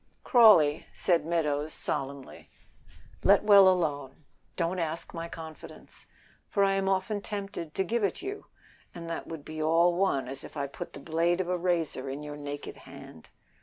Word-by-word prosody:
"Crawley," 205 - +6
said 170 -4 0
Meadows, 155 -3 -1
solemnly, 135 0 -5 0.7
"let 200 +1 +5
well 200 -2 +8
alone. 145 -5 -2 0.3
Don't 175 +1 -1
ask 165 0 -4
my 165 0 -5
confidence, 160 -1 -11 0.4
for 200 - +2
I 195 0 +3
am 195 0 0
often 195 +2 -1
tempted 195 -7 -6
to 190 - +1
give 225 +4 -1
it 200 - 0
you, 395 +2 -6 0.5
and 170 -1 -7
that 165 - -5
would 160 -3 -8
be 155 0 -6
all 165 +3 +4
one 170 -8 0
as 135 +3 -7
if - - -10
I 140 - -1
put 140 - -8
the - - -9
blade 170 +4 0
of 180 -1 -2
a 180 - +1
razor 170 -6 -1
in 140 +3 -5
your 150 0 -7
naked 145 0 -7
hand." 80 - -13
165 Hz, 170 wpm, -28 LUFS, 150-190 Hz, 0.7 s, well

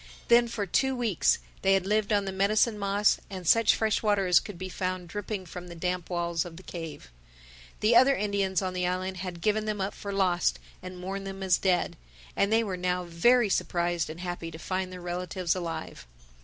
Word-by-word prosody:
Then 235 0 +6
for 215 -3 -3
two 265 +7 +1
weeks 230 -8 +2 0.2
they 195 0 +4
had 190 -1 0
lived 210 +1 +1
on 205 -1 +2
the 195 - -3
medicine 210 +3 +2
moss 200 +1 +2
and 185 -3 -7
such 230 +3 +5
fresh 220 -2 +1
water 205 -3 +2
as 180 -1 +6
could 205 -4 -9
be 185 +2 -5
found 185 -1 -3
dripping 205 0 -4
from 180 +1 -8
the 170 - -9
damp 180 0 -2
walls 170 -1 -1
of 170 -2 -10
the 185 - -11
cave. 165 - -8 0.7
The 220 +3 +4
other 260 +3 +6
Indians 200 -3 0
on 185 -1 -2
the 180 -1 0
island 185 +1 -2
had 180 -2 -6
given 215 +2 +1
them 210 -1 -2
up 195 +1 -2
for 200 - -6
lost 185 -3 +1 0.2
and 185 0 -8
mourned 195 +2 -5
them 195 0 -6
as 185 -2 +3
dead; 185 -2 +1 0.4
and 200 - +2
they 225 +1 +4
were 190 -4 -3
now 180 0 -1
very 215 +8 +3
surprised 175 -3 0
and 160 +3 -7
happy 175 -2 -4
to 160 - -9
find 185 +2 -3
their 180 -1 -8
relatives 175 0 -2
alive. 165 - -5
185 Hz, 210 wpm, -28 LUFS, 180-205 Hz, 0.7 s, Then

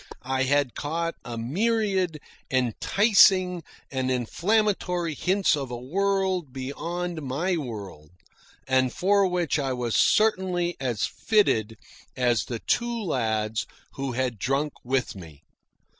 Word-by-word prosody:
I 130 +1 0
had 140 -2 +2
caught 165 +3 -2
a 120 -1 -6
myriad 190 - 0 0.3
enticing 185 - +4 0.3
and 130 -1 -1
inflammatory 180 - 0
hints 185 +4 +2
of 135 -3 -4
a 120 - -4
world 190 +3 0
beyond 165 +6 -4
my 150 +7 -1
world, 100 - -7 0.6
and 130 -1 +2
for 200 +4 +3
which 175 -4 0
I 135 -2 -1
was 120 -2 -2
certainly 185 -5 +2
as 125 -6 -1
fitted 110 - +1 0.4
as 120 -2 +2
the 120 - -4
two 235 - -1
lads 110 - -1 0.3
who 135 -2 -4
had 125 -3 -2
drunk 135 +6 0
with 130 -1 -1
me. 80 -7 -12
145 Hz, 120 wpm, -26 LUFS, 125-185 Hz, 0.6 s, enticing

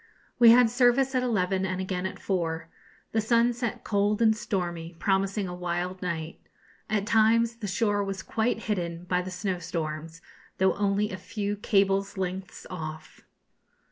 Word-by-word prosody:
We 235 -1 +9
had 235 0 +7
service 250 +2 +3
at 255 - +2
eleven 190 -6 0
and 185 -1 -2
again 185 -1 -2
at - - -8
four. 165 -4 -2 0.4
The 220 - +1
sun 235 +2 +3
set 235 -1 -4
cold 205 0 +1
and 220 -1 +4
stormy, 175 -5 -3
promising 195 +1 0
a 180 - -5
wild 180 +1 -3
night. 165 -3 -4 0.5
At 210 -2 0
times 230 +2 +3
the 215 - -5
shore 205 0 +1
was 195 -1 -4
quite 225 0 -1
hidden 175 -5 -2
by 180 0 0
the 185 - -6
snowstorms, 165 -4 -4 0.4
though 190 0 +3
only 205 +1 0
a 185 - -4
few 205 +2 -3
cables' 195 -1 +1
lengths 185 0 -4
off. 155 -3 -7
195 Hz, 155 wpm, -27 LUFS, 180-220 Hz, 0.5 s, We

